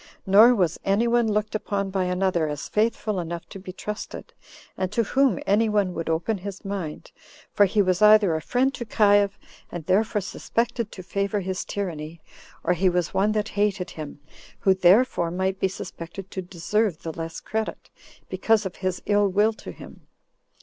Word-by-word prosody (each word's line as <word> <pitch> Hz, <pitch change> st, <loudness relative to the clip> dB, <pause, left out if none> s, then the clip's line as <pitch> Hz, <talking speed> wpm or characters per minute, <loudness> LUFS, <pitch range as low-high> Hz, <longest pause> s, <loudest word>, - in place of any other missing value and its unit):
Nor 215 Hz, +6 st, +7 dB
was 175 Hz, -6 st, 0 dB
any 200 Hz, +4 st, +2 dB
one 235 Hz, -2 st, +2 dB
looked 210 Hz, 0 st, -1 dB
upon 200 Hz, -2 st, -2 dB
by 190 Hz, -1 st, 0 dB
another 180 Hz, -3 st, +1 dB
as 145 Hz, -1 st, -5 dB
faithful 215 Hz, -2 st, 0 dB
enough 170 Hz, 0 st, -5 dB
to 195 Hz, -, -9 dB
be 185 Hz, 0 st, -8 dB
trusted, 210 Hz, +3 st, -7 dB, 0.4 s
and 185 Hz, -1 st, -2 dB
to 230 Hz, +2 st, +1 dB
whom 270 Hz, +4 st, +2 dB
any 215 Hz, +3 st, +3 dB
one 205 Hz, -3 st, +1 dB
would 165 Hz, -1 st, -4 dB
open 170 Hz, +6 st, 0 dB
his 195 Hz, +1 st, -8 dB
mind; 190 Hz, -6 st, -5 dB, 0.4 s
for 205 Hz, -, +5 dB
he 205 Hz, +2 st, +2 dB
was 185 Hz, 0 st, 0 dB
either 210 Hz, -4 st, +6 dB
a 160 Hz, -, -1 dB
friend 260 Hz, +8 st, +1 dB
to 240 Hz, -, -5 dB
Caius, 205 Hz, -2 st, +3 dB, 0.4 s
and 170 Hz, -3 st, -6 dB
therefore 210 Hz, +4 st, +2 dB
suspected 230 Hz, +3 st, -2 dB
to 185 Hz, -, -9 dB
favor 200 Hz, +2 st, -1 dB
his 185 Hz, 0 st, -3 dB
tyranny, 165 Hz, -5 st, -5 dB, 0.4 s
or 180 Hz, -, +2 dB
he 185 Hz, +2 st, +2 dB
was 180 Hz, -1 st, -1 dB
one 205 Hz, +2 st, +2 dB
that 210 Hz, 0 st, -1 dB
hated 200 Hz, -3 st, -1 dB
him, 150 Hz, -2 st, -8 dB, 0.4 s
who 190 Hz, -, +5 dB
therefore 190 Hz, 0 st, +4 dB
might 190 Hz, +2 st, -1 dB
be -, -, +2 dB
suspected 190 Hz, 0 st, -8 dB
to 190 Hz, -, -4 dB
deserve 185 Hz, +1 st, -1 dB
the 160 Hz, -, -4 dB
less 165 Hz, 0 st, -6 dB
credit, 220 Hz, 0 st, -4 dB, 0.4 s
because 220 Hz, -2 st, +1 dB
of 190 Hz, -, -5 dB
his 185 Hz, -1 st, -3 dB
ill 205 Hz, 0 st, +3 dB
will 205 Hz, +4 st, +2 dB
to -, -, -9 dB
him. -, -, -13 dB
195 Hz, 180 wpm, -24 LUFS, 180-210 Hz, 0.4 s, Nor